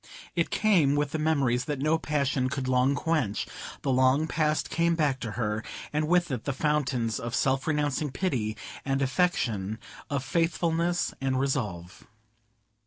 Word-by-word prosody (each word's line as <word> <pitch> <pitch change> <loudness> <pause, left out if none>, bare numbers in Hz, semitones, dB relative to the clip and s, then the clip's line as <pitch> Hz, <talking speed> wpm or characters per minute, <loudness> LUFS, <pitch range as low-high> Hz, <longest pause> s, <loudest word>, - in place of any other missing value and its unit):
It 170 -1 +1
came 175 -10 +3
with 145 -1 0
the 155 - -2
memories 135 -6 +1
that 150 -2 -2
no 155 +4 +1
passion 140 -4 0
could 135 -1 -3
long 130 +2 +3
quench; 150 -10 0 0.4
the 135 - +1
long 130 +4 +4
past 155 -1 0
came 170 0 +2
back 145 -5 +1
to 115 -5 -5
her, 110 -2 -2 0.3
and 150 +1 +1
with 175 -1 +2
it 125 -4 -3
the 140 - -1
fountains 130 -5 0
of 120 +2 -3
self 135 +2 +1
renouncing 150 -1 0
pity 125 - -1 0.3
and 135 0 0
affection, 115 - 0 0.3
of 140 -3 -1
faithfulness 170 +2 0
and 135 -1 +1
resolve. 105 -10 -3
140 Hz, 155 wpm, -28 LUFS, 130-155 Hz, 0.4 s, long